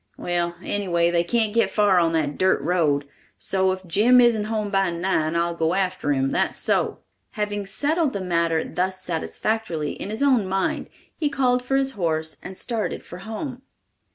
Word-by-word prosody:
Well, 175 -1 -1
anyway, 170 -4 +1
they 170 -1 +2
can't 220 +3 +1
get 230 - +3
far 205 -4 +3
on 165 -1 +2
that 150 -3 0
dirt 190 0 +2
road, 150 -4 +1 0.3
so 190 -1 +1
if 185 0 -5
Jim 220 +9 +4
isn't 235 -4 +4
home 215 -2 -2
by 195 -2 +2
nine, 170 -2 0
I'll 170 0 +1
go 165 +1 0
after 185 -6 0
'em, 135 -1 +1
that's - - 0
so." - - 0 0.3
Having 205 -3 -3
settled 295 - +1
the - - -2
matter 170 -3 +1
thus 185 +1 -2
satisfactorily 170 -1 -2
in - - -6
his 220 +6 -2
own 255 -8 +3
mind, 190 0 -1 0.3
he 300 - 0
called 255 -3 +1
for 270 +2 -1
his 270 0 +2
horse 160 -7 -2
and 190 0 -8
started 230 -3 -3
for 180 - -9
home. 235 +6 -6
190 Hz, 180 wpm, -23 LUFS, 170-220 Hz, 0.3 s, Jim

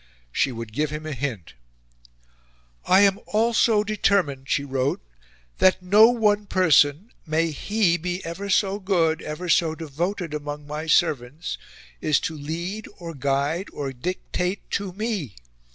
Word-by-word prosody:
She 135 - +1
would 115 -2 -7
give 150 +5 0
him 150 +1 -6
a 155 - -4
hint. 125 - -4 1.3
"I 190 +2 +5
am 200 -1 +4
ALSO 220 -1 +3
DETERMINED," 195 -10 0
she 145 - +1
wrote, 135 0 -1 0.6
"that 185 0 +4
NO 210 +5 +7
ONE 210 -4 +2
person 165 - +3 0.2
may 160 +1 +1
HE 185 +3 +1
be 180 +2 -4
ever 190 +5 -5
so 200 0 +2
good, 175 -5 +1
ever 155 +4 -5
so 165 -2 +3
devoted 165 +3 -3
among 145 0 -5
my 150 +2 -5
servants 145 +1 0 0.4
is 155 -2 +3
to 160 - -3
lead 170 +8 -5
or 170 -1 -7
guide 140 +6 -1
or 140 -2 -4
dictate 180 - -3
TO 200 -2 -2
ME. 195 - -3
165 Hz, 140 wpm, -24 LUFS, 145-195 Hz, 1.3 s, NO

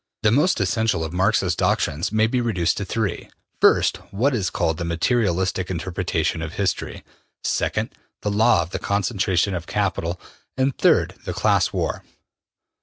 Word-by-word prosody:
The 105 - +4
most 145 +7 +3
essential 100 -2 +1
of 80 0 -5
Marx's 95 -1 +2
doctrines 80 +8 0
may 110 0 +3
be 125 +2 0
reduced 95 -8 0
to 100 - -3
three: 100 -1 -3 0.3
first, - - +4
what 125 +9 +1
is 100 -8 0
called 80 0 -1
the - - -2
material 85 +4 +1
istic 95 0 -1
interpretation 85 -2 -2
of 80 0 -5
history; 100 -3 -2 0.4
second, - - -1 0.3
the 105 - 0
law 100 -4 +4
of 80 - -11
the - - -3
concentration 100 -2 0
of 85 -1 -4
capital; 90 -4 -1 0.4
and, 130 0 +1
third, - - +3
the - - -3
class - - +2
war. - - -2
95 Hz, 160 wpm, -22 LUFS, 85-110 Hz, 0.4 s, The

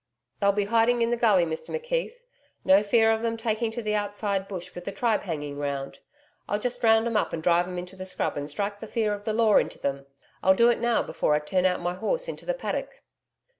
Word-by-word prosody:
'They'll 200 0 +4
be 205 0 0
hiding 230 +2 +3
in 230 - 0
the - - +3
gully, 210 -7 +4
Mr 160 -1 -5
McKeith. 485 0 -3 0.4
No 190 +2 +6
fear 225 +2 +3
of 220 0 0
them 230 0 -1
taking 225 0 -1
to 230 +1 -5
the 210 0 -1
outside 205 -1 -1
bush 185 -3 -7
with 175 - -8
the - - -3
tribe 220 +1 0
hanging 145 -5 -5
round. 140 -1 -4 0.5
I'll 205 - +1
just 245 +3 -2
round 225 0 +5
'em 235 -1 -2
up 210 - +1
and 160 - -4
drive 175 +1 +3
'em 180 0 -6
into 180 +1 -6
the 185 0 -7
scrub 185 - -2
and 145 0 -4
strike 205 +6 -3
the 220 - -8
fear 215 -2 0
of 205 0 -7
the 220 - -1
Law 220 -2 +4
into - - 0
them. 140 0 -3 0.3
I'll 190 0 +5
do 235 +4 +5
it - - -1
now 235 -1 +2
before 155 -1 0
I - - +2
turn 185 +5 +1
out 180 -1 -1
my 175 0 -1
horse 355 - -1
into - - -7
the - - 0
paddock.' - - -5
205 Hz, 245 wpm, -26 LUFS, 180-230 Hz, 0.5 s, No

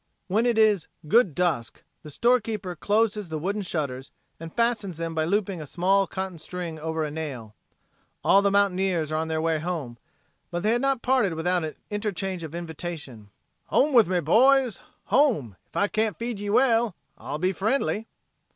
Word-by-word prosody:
When 215 +5 +1
it 235 -2 +1
is 210 -6 +4 0.2
"good 195 - +4
dusk" 165 -10 -1 0.2
the 155 - -10
storekeeper 220 - 0
closes 210 +1 0
the 160 - -3
wooden 195 +7 -2
shutters 140 -8 -4 0.3
and 165 0 -8
fastens 220 -6 0
them 165 0 -3
by 160 -1 0
looping 195 -1 -1
a 150 - -8
small 190 +5 +2
cotton 190 -3 -5
string 170 -1 -6
over 160 0 -2
a 150 - -3
nail. 135 -9 -6 0.7
All 195 - +5
the 200 - +3
mountaineers 190 -5 +1
are 155 - 0
on 160 +1 -1
their 160 0 -1
way 165 -1 +1
home, 155 -8 -4 0.5
but 175 -1 -3
they 215 - +3
had 240 +1 +1
not 275 -2 0
parted 245 -9 +2
without 175 +2 0
an 155 - -4 0.2
interchange 195 -4 -3
of 160 0 -7
invitation: 160 - -7 0.4
"Home 290 +2 +2
with 235 -6 +6
me, 180 0 +1
boys; 250 - +4 0.2
home! 225 - +2
Ef - - -30
I 200 - +3
can't 215 -4 0
feed 235 -3 -4
ye 205 0 -4
well, 230 -3 +3 0.2
I'll 135 +6 -4
be 185 +4 0
friendly." 220 +2 0
185 Hz, 180 wpm, -26 LUFS, 160-215 Hz, 0.7 s, with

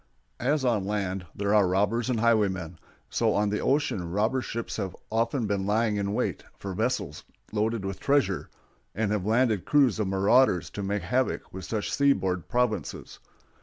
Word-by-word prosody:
As 135 +2 +1
on 115 -5 +2
land 95 -3 -2
there 100 +1 0
are 105 -3 +5
robbers 105 +6 +1
and 120 -3 0
highwaymen, 95 -8 +1 0.3
so - - +1
on 105 0 +1
the 105 - 0
ocean 130 - 0
robber 110 +8 +1
ships 115 -1 -4
have 95 -4 -3 0.2
often 115 +2 0
been 100 -2 -1
lying 110 0 +1
in 100 0 -1
wait - - -1
for 100 -1 -6
vessels 110 - -2 0.3
loaded 110 -1 -1
with 95 0 -4
treasure, 135 -10 +1 0.5
and 105 -1 0
have 105 -2 -1
landed 110 -3 +2
crews 135 -7 +3
of 105 - 0
marauders 95 - +3
to 105 - -5
make 100 -1 -2
havoc 125 +9 -1
with 95 0 -7
rich 110 -2 -2
seaboard 95 - +1
provinces. 125 -3 -2
105 Hz, 165 wpm, -27 LUFS, 95-115 Hz, 0.5 s, are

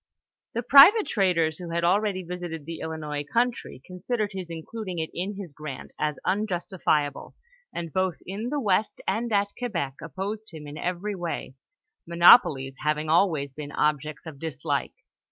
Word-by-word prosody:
The 235 - -1
private 295 - +8
traders 170 -6 +1
who 175 -2 -7
had 170 0 -1
already 190 +1 +2
visited 175 -3 -6
the 165 +1 -6
Illinois 150 -2 -4
country, 235 - -1
considered 205 +4 -3
his 185 -2 -5
including 180 +3 -6
it 160 -1 -3
in 195 +4 -3
his 190 -6 -8
grant 150 -3 -8
as 150 -2 -1
unjustifiable, 180 -6 -1 0.4
and 165 -2 -6
both 185 -2 +1
in 205 +6 -4
the 295 +1 -1
west 210 -3 +1
and 225 +4 -1
at 205 -1 +2
Quebec 170 - -3
opposed 200 +7 -5
liim 155 -2 -9
in 145 - -8
every 180 +5 -3
way, 175 -7 -4 0.5
monopolies 155 - +6
having 150 0 -1
always 160 -6 +2
been 145 0 -7
objects 150 +1 -1
of 155 -4 -9
dislike. 145 -2 -3
175 Hz, 155 wpm, -26 LUFS, 155-200 Hz, 0.5 s, private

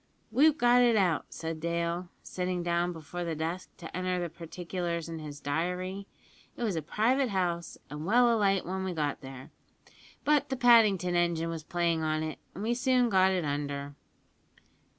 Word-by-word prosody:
"We've 295 +6 +5
got 245 -2 +5
it 240 -2 +4
out," 180 -7 +2
said 160 -1 -5
Dale, 170 +2 -2
sitting 180 -1 -3
down 175 +1 +1
before 175 +2 -6
the 165 -2 -2
desk 165 +4 -3
to 165 -2 -9
enter 185 0 -1
the 175 -1 -2
particulars 170 0 -4
in 165 -1 -6
his 150 -2 -8
diary; 180 +7 -2 0.5
"it - - -3
was 210 -6 0
a 160 - -1
private 245 - +1
house, 175 -4 -2
and 150 +1 -7
well 235 +5 +4
alight 195 -3 +2
when 190 +1 -3
we 190 -1 -2
got 150 -3 -2
there, 130 -1 -10 0.7
but 295 -2 +2
the 265 - -2
Paddington 215 -8 +5
engine 170 -1 +1
was 165 -2 -5
playing 170 0 0
on 155 0 0
it, 155 -1 -5 0.2
and 195 - -5
we 230 +2 +1
soon 250 -1 +2
got 190 -2 +4
it 180 -4 0
under." 145 0 -3
175 Hz, 175 wpm, -30 LUFS, 165-200 Hz, 0.7 s, We've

